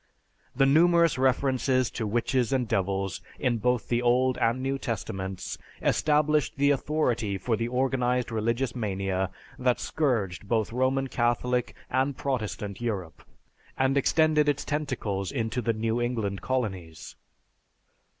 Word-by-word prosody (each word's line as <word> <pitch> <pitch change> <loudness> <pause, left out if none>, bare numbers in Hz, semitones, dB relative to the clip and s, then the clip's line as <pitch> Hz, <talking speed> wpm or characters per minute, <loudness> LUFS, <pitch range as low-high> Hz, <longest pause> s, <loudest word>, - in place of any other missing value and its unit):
The 135 +1 +4
numerous 165 +1 +4
references 130 -1 +2
to 110 - -3
witches 120 +3 0
and 130 -3 +1
devils 95 -1 -1 0.2
in 120 -4 0
both 125 +1 0
the 120 0 +1
Old 125 +1 +3
and 115 +2 +2
New 135 +1 -1
Testaments 95 -6 -4 0.2
established 150 -1 +2
the 140 +1 +4
authority 125 -7 0
for 115 +4 0
the 115 +1 -2
organized 125 -1 0
religious 115 +3 -1
mania 95 -4 -1 0.3
that 125 -1 +2
scourged 105 - -1
both 110 0 0
Roman 130 +2 +1
Catholic 125 0 0
and 130 +1 0
Protestant 110 -6 -3
Europe, 95 -9 -4 0.5
and 130 +1 +2
extended 150 +1 +3
its 145 -1 -1
tentacles 120 -10 -2
into 120 -1 -2
the 115 - +1
New 115 +1 -1
England 110 -6 -2
colonies. 95 - -3
125 Hz, 130 wpm, -27 LUFS, 110-135 Hz, 0.5 s, The